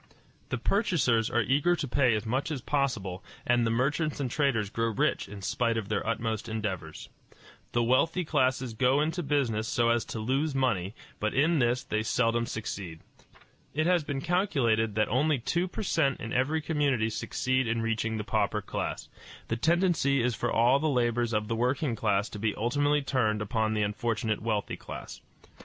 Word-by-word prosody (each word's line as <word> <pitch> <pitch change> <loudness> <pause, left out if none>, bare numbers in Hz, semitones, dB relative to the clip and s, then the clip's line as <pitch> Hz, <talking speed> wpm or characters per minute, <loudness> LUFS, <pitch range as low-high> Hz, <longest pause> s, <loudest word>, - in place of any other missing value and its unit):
The - - -1
purchasers 140 - +1
are 120 0 +2
eager 145 +8 +2
to 150 - -3
pay 130 -3 +3
as 105 - -3
much 130 +7 -1
as 150 -4 -3
possible, 120 -11 -1 0.2
and 120 -1 +3
the - - +1
merchants 145 +7 0
and 130 -4 -2
traders 120 -9 +1
grow 115 0 0
rich 110 - 0
in 100 -1 -9
spite 115 +3 0
of 105 -3 -4
their 105 - 0
utmost 115 -1 -2
endeavors. 95 -8 -4 0.6
The 120 - +2
wealthy 165 +9 +2
classes 130 -4 +1
go 125 +5 +3
into 160 +4 0
business 130 -8 0
so 115 0 +2
as 115 -1 +2
to - - -6
lose 135 +7 0
money, 105 -7 0 0.2
but 105 0 -1
in 155 +4 +3
this 120 +1 +1
they 110 - -1
seldom 115 +1 +1
succeed. 95 -7 -5 0.7
It 155 +1 +1
has 175 -2 +3
been 140 -2 -3
calculated 135 - +1
that 110 0 +2
only 145 +5 +2
two 170 +9 -1
per 200 - -5
cent 155 -8 +1
in 110 +2 -5
every 145 +5 +1
community 140 -8 +1
succeed 130 +3 -1
in 115 0 0
reaching 115 0 -1
the 105 - -3
pauper - - 0
class. - - -4 0.4
The 115 - +1
tendency 160 -2 +2
is 125 0 +1
for 120 +2 -2
all 120 +4 +4
the 155 +1 +1
labors 120 -3 +1
of 105 -1 0
the 115 - -1
working 125 +2 0
class 105 -1 +1
to 105 - -8
be 110 0 0
ultimately 145 +6 +1
turned 115 -6 +1
upon 110 +1 0
the 105 - +1
unfortunate 110 +1 -1
wealthy 110 -2 -2
class. - - -9
120 Hz, 185 wpm, -28 LUFS, 110-140 Hz, 0.7 s, all